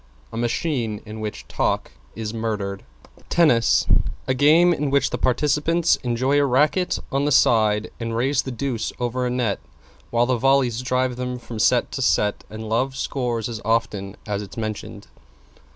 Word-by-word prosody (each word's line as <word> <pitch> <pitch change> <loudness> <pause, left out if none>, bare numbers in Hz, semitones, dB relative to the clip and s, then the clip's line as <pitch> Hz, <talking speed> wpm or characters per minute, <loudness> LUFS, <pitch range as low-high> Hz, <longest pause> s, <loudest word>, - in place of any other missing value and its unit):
A - - -6
machine 120 -2 -1
in 110 +1 -8
which 105 -1 -6
talk - - -1 0.2
is 110 -1 -4
murdered. 105 -4 -3 0.5
=TENNIS= 140 -10 +4 0.4
A 130 - +2
game 160 +6 +5
in 150 -3 -1
which 140 -1 +2
the - - -1
participants 150 +6 +2
enjoy 130 +4 +1
a - - +3
racket 150 +8 +2
on 140 +1 +1
the 145 - +1
side 110 -4 +3
and 115 -1 -3
raise 135 +4 +2
the - - -6
deuce 125 -1 -3
over 125 +1 -1
a - - -1
net, 120 -5 -1 0.5
while 120 0 +2
the 130 0 +1
volleys 130 -2 +2
drive 125 -1 0
them 125 0 -3
from 120 -2 -8
set - - +3
to - - -4
set 105 -1 +1
and 110 +1 -7
love 130 +5 0
scores 120 -5 -2
as 115 -2 -6
often 105 -4 -1
as 105 -1 -2
it's 100 +1 -10
mentioned. 110 -2 -5
120 Hz, 170 wpm, -23 LUFS, 110-135 Hz, 0.5 s, game